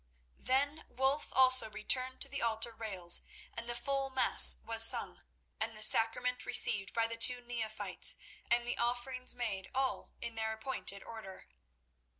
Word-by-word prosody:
Then 285 +4 -2
Wulf 265 +3 -2
also 255 -3 +4
returned 255 +5 -3
to - - -9
the 275 0 -7
altar 230 0 -3
rails, 190 -6 -1 0.3
and 235 +1 -8
the 240 - -4
full 275 +3 -3
Mass 265 - +5
was 225 0 +5
sung, 225 - +5 0.4
and 220 0 -4
the 215 - -3
Sacrament 235 +2 +4
received 195 -2 +3
by 230 -1 -1
the 230 0 -7
two 245 +2 +2
neophytes, 235 -3 -3 0.3
and 240 0 0
the 245 - -5
offerings 245 +2 -4
made 210 -6 -6
all 265 0 -3
in 235 0 -7
their 220 0 -4
appointed 220 -4 -6
order. 220 -5 -12
235 Hz, 155 wpm, -32 LUFS, 220-255 Hz, 0.4 s, Mass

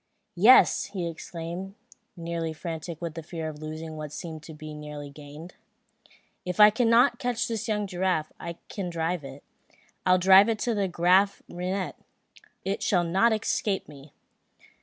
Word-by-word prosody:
"Yes," 220 +9 +6
exclaimed 170 +2 -5 0.4
he, 175 - -11
nearly 165 -1 -3
frantic 165 0 -6
with 170 -2 -4
the 165 - -6
fear 160 0 -6
of 150 -1 -8
losing 155 +1 -6
what 150 -1 -6
seemed 160 -1 -7
so 160 - -10
nearly 150 -2 -8
gained. 150 +4 -11 0.9
"If 180 +2 -4
I 210 0 +9
cannot 235 +3 +4
catch 245 -3 -1
this 225 0 -3
young 210 -2 0
giraffe, 180 -4 -1
I 170 0 -6
can 190 -4 -4
drive 165 0 -2
it. 135 +1 -10 0.6
I'll 185 0 +4
drive 190 +3 +7
it 225 - 0
to 210 -5 0
Graaf 185 +3 +3
Reinet. 185 +2 -3 0.7
It 195 +1 -2
shall 180 -3 +2
not 190 +8 +3
escape 220 -1 -1
me!" 140 -1 -14
175 Hz, 150 wpm, -27 LUFS, 160-200 Hz, 0.9 s, I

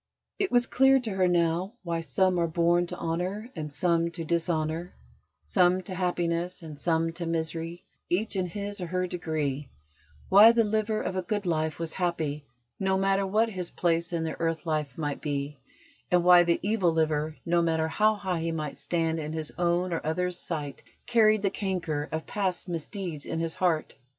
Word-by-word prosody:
It 395 -2 0
was 245 -1 +4
clear 270 +2 +4
to 230 -3 -4
her 190 -1 +2
now 175 +3 +1
why 170 -2 -2
"some 180 +4 +1
are 170 - +2
born 170 +1 +2
to - - -6
honour 185 +8 -3
and 150 -3 -5
some 170 +2 +1
to 165 -1 -5
dishonour": 165 0 -1 0.5
some 185 0 +3
to 185 - -7
happiness 175 -1 -1
and 155 -3 -9
some 165 -1 +1
to 170 0 -5
misery, 165 +1 -3 0.2
each 205 +5 0
in 185 -1 0
his 200 +2 -5
or 175 - -3
her 180 +1 -1
degree; 155 -6 -3 0.6
why 210 +4 +8
the 230 -1 +4
liver 215 0 0
of 185 - -3
a 185 - 0
good 205 +2 -2
life 160 -3 0
was 165 -1 -3
happy, 160 -5 -2 0.3
no 190 0 +1
matter 195 0 +2
what 220 +4 +2
his 185 -4 -4
place 170 0 0
in 170 -2 -1
the 160 - -4
earth 165 0 -1
life 150 -4 -2
might 145 -3 -3
be: 145 -1 -3 0.5
and 180 -1 +3
why 180 0 +8
the 170 0 +2
evil 200 -4 +2
liver, 155 -1 0
no 170 0 +3
matter 160 -1 +1
how 215 +6 +3
high 190 -4 -2
he 165 0 -1
might 155 -4 -4
stand 160 +2 0
in 155 0 -4
his 160 -1 -3
own 175 +1 +1
or 165 - -2
others' 180 +3 -1
sight, 150 -4 -4 0.2
carried 215 -3 +4
the 195 - +2
canker 175 -8 -2
of 160 0 -3
past 195 -2 -2
misdeeds 170 -2 -5
in - - -3
his 165 -1 -1
heart. 170 -4 0
170 Hz, 190 wpm, -28 LUFS, 160-190 Hz, 0.6 s, why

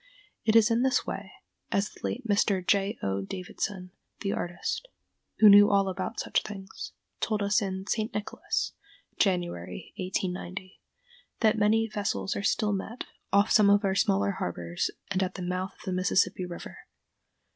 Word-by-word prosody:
It 220 0 +3
is 225 0 +6
in 230 +1 +3
this 260 0 +2
way, - - -5 0.4
as 200 +1 +1
the - - -16
late 245 0 -3
Mr. 200 -3 +2
J. 200 +3 +2
O. 100 0 0
Davidson, 185 - -5 0.3
the 195 - -1
artist, 175 - -3 0.5
who 215 - +7
knew 205 0 +9
all 200 -1 +3
about 190 +4 -4
such - - +1
things, 195 -2 -8 0.3
told 215 -2 0
us 205 +2 +3
in 190 -1 -3
"St. 215 +1 -1
Nicholas" 210 - -2 0.5
(January, 175 - -1
1890), 185 0 -4 0.6
that 220 -1 +4
many 220 +1 +3
vessels 205 -2 -2
are - - -2
still 210 +1 +1
met, 215 +5 -4 0.3
off 200 +2 +4
some 210 -2 +6
of 205 +1 +4
our 190 - +2
smaller 100 - +2
harbors, 85 -1 -2 0.2
and 190 -1 +1
at 185 - -1
the 185 - -5
mouth 185 +1 -2
of - - -16
the 185 - -2
Mississippi 185 0 +1
River. 175 - -8
195 Hz, 160 wpm, -28 LUFS, 185-210 Hz, 0.6 s, knew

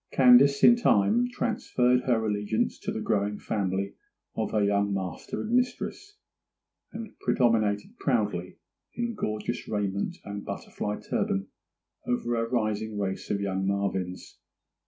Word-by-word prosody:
Candace, 135 +2 +6
in 235 - +9
time, 235 - +3
transferred 125 - +1
her 115 -3 +2
allegiance 105 +1 -1
to - - -3
the - - -3
growing 105 0 0
family 100 -2 -2 0.4
of - - -1
her 105 -1 +1
young 100 0 +2
master 95 -3 -4
and 225 - -4
mistress; 260 - -1 0.7
and 220 0 -7
predominated 115 - +1
proudly, 105 - -1 0.4
in 235 0 -2
gorgeous 110 - -3
raiment 100 -2 -2
and 100 0 -5
butterfly 105 0 -4
turban, 95 0 -1 0.6
over 120 -1 0
a 115 0 -1
rising 110 -2 -1
race 95 -2 -3
of 100 -1 0
young 95 -1 -1
Marvyns. 95 -2 -2
105 Hz, 130 wpm, -27 LUFS, 100-125 Hz, 0.7 s, in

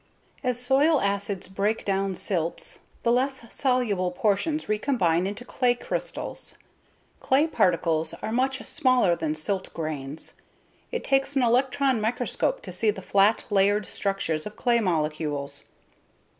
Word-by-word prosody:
As 250 -2 +1
soil 275 +5 +4
acids 200 -2 -1
break 200 +4 -1
down 195 -1 0
silts, 170 -3 0 0.2
the 235 - +3
less 260 +1 0
soluble 240 -9 +1
portions 215 - 0
recombine 200 - +1
into 205 +5 -6
clay 250 -1 +1
crystals. - - -4 0.6
Clay 275 +4 +3
particles 165 - +1
are - - -5
much 265 +3 +1
smaller 255 - +3
than 155 -2 -2
silt 190 +5 -2
grains. 155 -2 -4 0.6
It 480 - -3
takes 270 +1 +1
an 270 - +3
electron 255 +1 +2
microscope 245 - -1
to - - -7
see 220 - +2
the 195 -2 -3
flat, 200 +3 +3
layered 200 +1 +3
structures 195 -5 -2
of 210 - -10
clay 240 -2 +2
molecules. 150 -6 -2
210 Hz, 130 wpm, -26 LUFS, 180-255 Hz, 0.6 s, soil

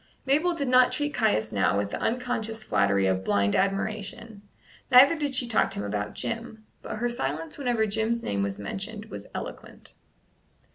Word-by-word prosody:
Mabel 310 +6 +2
did 280 -4 -2
not 255 0 +5
treat 290 -1 -1
Caius 220 - +1
now 100 -1 +2
with 100 0 -1
the - - -3
unconscious 225 -2 -1
flattery 100 - +2
of 95 0 +1
blind 100 +1 +1
admiration, 205 +2 -2 0.5
neither 270 +6 +8
did 290 -3 -1
she 250 -1 +1
talk 235 - +2
to - - -4
him 100 - -3
about 105 0 -3
Jim; 230 -1 -5 0.2
but - - -6
her 235 +3 -1
silence 160 - -4
whenever 240 -5 +1
Jim's 220 +2 -1
name 100 -1 -1
was 100 0 -2
mentioned 200 - -5
was - - -8
eloquent. - - -8
220 Hz, 175 wpm, -26 LUFS, -, 0.5 s, neither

